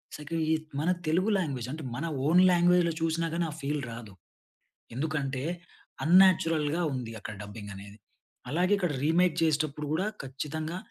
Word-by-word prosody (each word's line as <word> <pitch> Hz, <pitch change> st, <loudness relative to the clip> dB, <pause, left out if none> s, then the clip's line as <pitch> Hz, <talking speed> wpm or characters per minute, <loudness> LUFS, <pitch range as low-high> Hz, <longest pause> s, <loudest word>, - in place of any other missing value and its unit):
సక 150 Hz, +2 st, -10 dB, 0.5 s
మన 160 Hz, +4 st, 0 dB, 0.2 s
తెలుగు 180 Hz, +7 st, +2 dB
లాంగ్వేజ్ 135 Hz, -9 st, -2 dB
అంటే 155 Hz, +2 st, -6 dB
మన 145 Hz, +7 st, -3 dB, 0.2 s
ఓన్ 175 Hz, +3 st, +6 dB
లాంగ్వేజ్‌లో 175 Hz, -1 st, +4 dB
చూసినా 165 Hz, +1 st, 0 dB
గానీ 170 Hz, 0 st, 0 dB
ఆ -, -, -8 dB
ఫీల్ 145 Hz, +1 st, -1 dB
రాదు. 115 Hz, -3 st, -9 dB, 0.8 s
ఎందుకంటే, 140 Hz, -2 st, -2 dB, 0.6 s
అన్‌నాచురల్‌గా 165 Hz, -3 st, +4 dB
ఉంది 120 Hz, -3 st, -4 dB
అక్కడ 110 Hz, -, -7 dB
డబ్బింగ్ 100 Hz, 0 st, -8 dB
అనేది. 100 Hz, +2 st, -11 dB, 0.5 s
అలాగే 180 Hz, +6 st, +1 dB
ఇక్కడ 180 Hz, -5 st, -1 dB
రీమేక్ 170 Hz, +2 st, +3 dB
చేసేటప్పుడు 150 Hz, -2 st, 0 dB
కూడా 185 Hz, +6 st, 0 dB, 0.2 s
ఖచ్చితంగా, 155 Hz, +5 st, -4 dB
155 Hz, 140 wpm, -29 LUFS, 135-170 Hz, 0.8 s, ఓన్